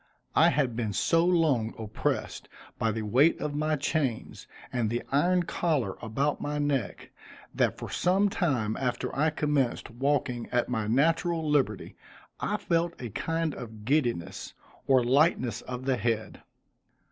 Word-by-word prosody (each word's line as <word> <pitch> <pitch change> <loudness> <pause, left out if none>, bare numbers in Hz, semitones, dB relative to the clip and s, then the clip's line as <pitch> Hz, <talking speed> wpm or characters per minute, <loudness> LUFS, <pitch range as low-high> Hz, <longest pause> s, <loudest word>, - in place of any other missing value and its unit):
I - - +6
had 135 -6 0
been 110 -3 -2
so 165 - +2
long 155 -11 +2
oppressed 110 -1 -3 0.3
by 110 - +1
the 110 0 -3
weight 130 +10 +3
of 150 - -3
my 155 +1 0
chains, 140 -5 -2 0.3
and 120 -3 0
the 120 +2 -2
iron 175 +6 +3
collar 150 - -1
about 135 +7 -1
my 150 0 -2
neck, 145 -6 -2 0.4
that - - +1
for - - -6
some 190 +3 +2
time 130 - 0
after 125 -2 -2
I 150 +4 +3
commenced 150 -6 -1
walking 125 -1 -1
at 120 0 0
my 110 -4 -1
natural 165 +6 +1
liberty, 135 -9 0 0.4
I - - -1
felt 170 0 -1
a 120 -3 -6
kind 165 +5 -1
of 110 -3 -9
giddiness, 120 - -1 0.3
or 130 -2 +5
lightness 130 -1 +2
of 125 0 -6
the 135 -2 +1
head. 110 0 -2
135 Hz, 145 wpm, -28 LUFS, 115-155 Hz, 0.4 s, I